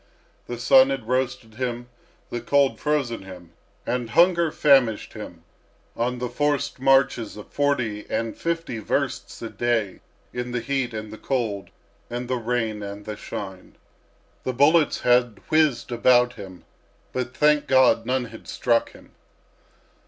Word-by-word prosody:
The 120 Hz, -, -5 dB
sun 130 Hz, +2 st, +6 dB
had 135 Hz, -5 st, -3 dB
roasted 125 Hz, -3 st, -1 dB
him, 120 Hz, -1 st, -3 dB, 0.4 s
the 120 Hz, -, -3 dB
cold 140 Hz, +3 st, +2 dB
frozen 145 Hz, -6 st, -1 dB
him, 90 Hz, -3 st, -12 dB, 0.3 s
and 125 Hz, -2 st, -2 dB
hunger 170 Hz, 0 st, +4 dB
famished 135 Hz, -9 st, +3 dB
him -, -, -9 dB, 0.5 s
on 125 Hz, +2 st, -1 dB
the 125 Hz, 0 st, -3 dB
forced 145 Hz, +3 st, -1 dB
marches 135 Hz, -5 st, +2 dB
of 105 Hz, -, -12 dB
forty 125 Hz, -8 st, -1 dB
and 115 Hz, -1 st, -2 dB
fifty 165 Hz, -8 st, -3 dB
versts 110 Hz, -, -3 dB
a 115 Hz, -, -4 dB
day 115 Hz, -5 st, -1 dB, 0.3 s
in 125 Hz, 0 st, -4 dB
the 120 Hz, -, 0 dB
heat 130 Hz, -1 st, -2 dB
and 110 Hz, 0 st, -6 dB
the 110 Hz, -, -10 dB
cold 115 Hz, -7 st, -2 dB, 0.4 s
and 120 Hz, +1 st, -4 dB
the 130 Hz, 0 st, -1 dB
rain 115 Hz, -2 st, -2 dB
and 100 Hz, 0 st, -7 dB
the 105 Hz, -, -5 dB
shine. 95 Hz, -2 st, -8 dB, 0.7 s
The 130 Hz, -, -2 dB
bullets 150 Hz, +5 st, +3 dB
had 120 Hz, -3 st, +3 dB
whizzed 150 Hz, -7 st, +2 dB
about 125 Hz, +1 st, +4 dB
him, 95 Hz, -5 st, -11 dB, 0.5 s
but, 130 Hz, 0 st, -4 dB
thank 150 Hz, 0 st, +3 dB
God! 130 Hz, -3 st, +4 dB
none 125 Hz, +1 st, 0 dB
had 115 Hz, -1 st, -12 dB
struck 115 Hz, -2 st, 0 dB
him. -, -, -17 dB
120 Hz, 145 wpm, -24 LUFS, 115-135 Hz, 0.7 s, sun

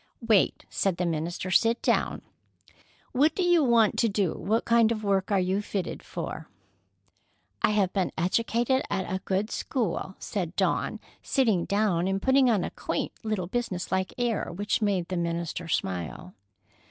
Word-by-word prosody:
"Wait," 215 Hz, -5 st, +3 dB
said 190 Hz, -3 st, 0 dB
the 180 Hz, -, 0 dB
minister. 170 Hz, +3 st, -2 dB
"Sit 230 Hz, +4 st, +3 dB
down. -, -, +1 dB, 0.9 s
What 290 Hz, +5 st, +3 dB
do 375 Hz, -, 0 dB
you 350 Hz, -3 st, +4 dB
want 235 Hz, -4 st, +3 dB
to 230 Hz, -, +3 dB
do? 195 Hz, -4 st, 0 dB
What 225 Hz, +3 st, -1 dB
kind 230 Hz, -1 st, +4 dB
of 215 Hz, -2 st, -2 dB
work 195 Hz, -1 st, +1 dB
are 200 Hz, -, +3 dB
you 185 Hz, +2 st, 0 dB
fitted 200 Hz, -2 st, -4 dB
for?" -, -, -6 dB, 1.1 s
"I -, -, +4 dB
have 205 Hz, -3 st, +1 dB
been 190 Hz, -3 st, 0 dB
educated 230 Hz, +8 st, +1 dB
at 190 Hz, -2 st, -1 dB
a 190 Hz, 0 st, -3 dB
good 195 Hz, +3 st, -1 dB
school," 200 Hz, -, -2 dB
said 185 Hz, -4 st, -4 dB
Dawn, -, -, 0 dB, 0.2 s
sitting 220 Hz, -10 st, +1 dB
down 200 Hz, -4 st, +1 dB
and 195 Hz, 0 st, 0 dB
putting 265 Hz, +3 st, +4 dB
on 210 Hz, -6 st, +2 dB
a -, -, -4 dB
quaint -, -, -3 dB
little 215 Hz, -5 st, -2 dB
business 190 Hz, -3 st, -3 dB
like 190 Hz, 0 st, 0 dB
air 240 Hz, -6 st, -1 dB
which 205 Hz, +6 st, -1 dB
made 195 Hz, -5 st, +1 dB
the 185 Hz, -, -3 dB
minister 170 Hz, 0 st, -3 dB
smile. 90 Hz, -, -3 dB
200 Hz, 165 wpm, -27 LUFS, 180-230 Hz, 1.1 s, you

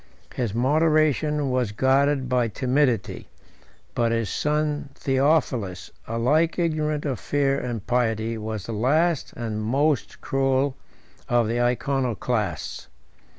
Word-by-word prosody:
His 115 Hz, -5 st, -2 dB
moderation 150 Hz, +1 st, +2 dB
was 125 Hz, -4 st, 0 dB
guarded 135 Hz, +3 st, +2 dB
by 125 Hz, -2 st, +1 dB
timidity; 125 Hz, -1 st, 0 dB, 0.6 s
but 115 Hz, -1 st, +1 dB
his 115 Hz, -2 st, -1 dB
son 150 Hz, -1 st, -1 dB
Theophilus, 135 Hz, -, 0 dB, 0.2 s
alike 140 Hz, +9 st, +1 dB
ignorant 155 Hz, -3 st, 0 dB
of 130 Hz, -7 st, -2 dB
fear 140 Hz, +2 st, 0 dB
and 115 Hz, -4 st, -4 dB
pity, 115 Hz, -2 st, 0 dB
was 110 Hz, -2 st, -5 dB
the 115 Hz, -, -5 dB
last 150 Hz, +8 st, +1 dB
and 110 Hz, -2 st, -4 dB
most 135 Hz, +5 st, 0 dB
cruel 135 Hz, 0 st, 0 dB, 0.5 s
of 120 Hz, -2 st, +3 dB
the 120 Hz, +2 st, 0 dB
Iconoclasts. 120 Hz, -4 st, -1 dB
130 Hz, 110 wpm, -24 LUFS, 115-145 Hz, 0.6 s, of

